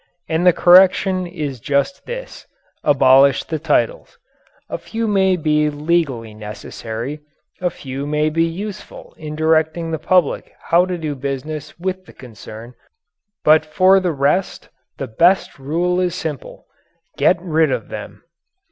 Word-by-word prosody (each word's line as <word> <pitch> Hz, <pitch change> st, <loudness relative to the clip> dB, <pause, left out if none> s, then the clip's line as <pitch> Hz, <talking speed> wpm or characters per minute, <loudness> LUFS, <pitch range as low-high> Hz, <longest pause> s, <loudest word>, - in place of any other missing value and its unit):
And 165 Hz, +2 st, +1 dB
the -, -, +9 dB
correction 185 Hz, +1 st, +4 dB
is 150 Hz, -7 st, -5 dB
just 140 Hz, -, -1 dB
this -, -, -8 dB, 0.4 s
abolish 135 Hz, 0 st, +5 dB
the 160 Hz, -, -4 dB
titles. -, -, -1 dB, 0.5 s
A -, -, -5 dB
few 225 Hz, 0 st, -4 dB
may 190 Hz, -2 st, +3 dB
be 150 Hz, -2 st, +1 dB
legally 145 Hz, -7 st, -1 dB
necessary; 110 Hz, +5 st, -7 dB, 0.4 s
a 180 Hz, -, +1 dB
few 135 Hz, -2 st, -6 dB
may 150 Hz, +1 st, 0 dB
be 165 Hz, +1 st, +2 dB
useful 200 Hz, +5 st, -6 dB
in 150 Hz, -1 st, -6 dB
directing 160 Hz, +1 st, +1 dB
the 160 Hz, -, -2 dB
public 180 Hz, -1 st, +1 dB
how 175 Hz, +2 st, +2 dB
to 180 Hz, -1 st, -3 dB
do 155 Hz, -3 st, -3 dB
business 140 Hz, +3 st, -5 dB
with 185 Hz, +1 st, -3 dB
the -, -, -14 dB
concern, 115 Hz, -1 st, -11 dB, 0.7 s
but 155 Hz, +1 st, +5 dB
for 185 Hz, +5 st, +4 dB
the 180 Hz, -2 st, -1 dB
rest 145 Hz, +6 st, -1 dB, 0.3 s
the 135 Hz, -, -4 dB
best 170 Hz, -, +2 dB
rule 170 Hz, +6 st, 0 dB
is 180 Hz, -1 st, 0 dB
simple: 155 Hz, -7 st, -6 dB, 0.5 s
"Get 180 Hz, -, +3 dB
rid 160 Hz, -4 st, +1 dB
of -, -, -3 dB
them." -, -, -8 dB
160 Hz, 140 wpm, -19 LUFS, 140-180 Hz, 0.7 s, the